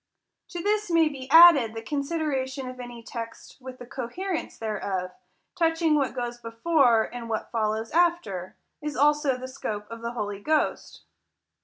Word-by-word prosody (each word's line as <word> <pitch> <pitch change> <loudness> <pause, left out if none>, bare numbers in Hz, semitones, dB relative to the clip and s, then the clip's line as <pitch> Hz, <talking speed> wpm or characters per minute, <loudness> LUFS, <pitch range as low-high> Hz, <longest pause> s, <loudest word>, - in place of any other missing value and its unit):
To 345 -1 -6
this 420 0 0
may 330 -2 +4
be 265 -3 -9
added, 315 -10 +8
the 225 - -6
consideration 280 -2 -2
of 255 0 -8
any 240 -1 -8
text 230 -1 -8
with 255 0 -9
the 245 - -10
coherence 275 +9 -4
thereof, 195 -4 -3 0.4
touching 325 -1 +2
what 280 -3 +1
goes 240 -1 -4
before, 235 0 +3
and 235 -1 -7
what 220 -1 -3
follows 220 0 -1
after; 325 - 0 0.3
as 300 -1 -4
also 295 -1 +3
the 255 0 -7
scope 215 -6 -5
of 230 0 -8
the 235 +1 -4
Holy 205 -4 -4
Ghost. 305 +8 -1
255 Hz, 155 wpm, -26 LUFS, 230-310 Hz, 0.4 s, added